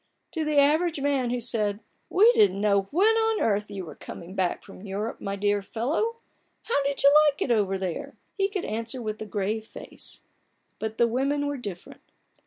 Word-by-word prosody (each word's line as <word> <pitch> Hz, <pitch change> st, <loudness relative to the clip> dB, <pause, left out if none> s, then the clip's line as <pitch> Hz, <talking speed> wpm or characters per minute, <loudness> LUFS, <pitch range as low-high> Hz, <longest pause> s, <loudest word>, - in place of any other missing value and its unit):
To 320 Hz, -, -2 dB
the 300 Hz, -1 st, 0 dB
average 305 Hz, +3 st, +3 dB
man 275 Hz, -3 st, +1 dB
who 245 Hz, +1 st, -1 dB
said: 215 Hz, -3 st, 0 dB, 0.2 s
" -, -, -44 dB
We 425 Hz, +6 st, +6 dB
didn't 420 Hz, -, +4 dB
know 200 Hz, -2 st, +2 dB
when 415 Hz, +8 st, +4 dB
on 445 Hz, -1 st, +2 dB
earth 210 Hz, -1 st, +1 dB
you 195 Hz, -3 st, -6 dB
were 155 Hz, -, -9 dB
coming 175 Hz, +5 st, -10 dB
back 185 Hz, -3 st, -1 dB
from -, -, -13 dB
Europe, 205 Hz, +3 st, -4 dB
my 200 Hz, 0 st, -3 dB
dear 205 Hz, 0 st, +1 dB
fellow; 285 Hz, -, -1 dB, 0.5 s
how 285 Hz, -, +1 dB
did 280 Hz, 0 st, -2 dB
you 280 Hz, +1 st, +7 dB
like 290 Hz, -1 st, 0 dB
it 250 Hz, -, -1 dB
over 200 Hz, -4 st, +2 dB
there? 185 Hz, -3 st, -4 dB
" -, -, -45 dB
he 390 Hz, -, +3 dB
could 390 Hz, -3 st, -3 dB
answer 230 Hz, +4 st, -3 dB
with 215 Hz, -2 st, -4 dB
a 220 Hz, -, -5 dB
grave 210 Hz, +2 st, -2 dB
face; 220 Hz, -, -8 dB, 0.6 s
but 220 Hz, 0 st, -4 dB
the 235 Hz, -, +4 dB
women 275 Hz, +5 st, 0 dB
were 285 Hz, 0 st, -1 dB
different. 200 Hz, -8 st, -8 dB
230 Hz, 200 wpm, -26 LUFS, 205-290 Hz, 0.6 s, you